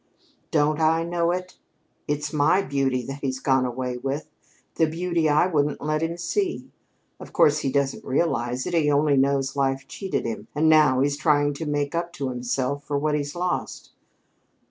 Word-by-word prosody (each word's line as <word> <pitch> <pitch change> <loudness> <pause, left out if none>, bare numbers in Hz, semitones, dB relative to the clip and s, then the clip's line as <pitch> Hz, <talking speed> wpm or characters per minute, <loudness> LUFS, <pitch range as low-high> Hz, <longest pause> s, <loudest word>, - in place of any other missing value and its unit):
"Don't 150 0 +2
I 160 +1 +3
know 170 0 0
it? 180 +1 -4 0.5
It's 150 0 -2
my 155 +6 +3
beauty 135 -5 0
that 135 +3 -6
he's 130 -2 -2
gone 130 -1 +2
away 125 0 -3
with 135 +4 -4 0.4
the 160 - +2
beauty 170 0 0
I 150 +3 +4
wouldn't 150 -5 0
let 155 +1 -1
him 165 +1 -2
see. 360 - -2 0.5
Of - - -11
course, 150 +1 +4
he 135 -3 -1
doesn't 140 -1 0
realize 125 -4 -1
it. - - -4
He 160 -3 +3
only 145 0 +3
knows 135 0 +1
life 135 -1 0
cheated 195 -2 -3
him, 110 -2 -5
and 155 +2 +2
now 150 -5 +5
he's 140 +1 +1
trying 145 -2 +2
to 155 +2 -5
make 145 -1 -1
up 170 +1 -2
to 135 -5 -3
himself 130 +3 -2
for 145 0 -2
what 150 +1 0
he's 145 0 -2
lost." 180 0 -3
145 Hz, 180 wpm, -24 LUFS, 135-160 Hz, 0.5 s, now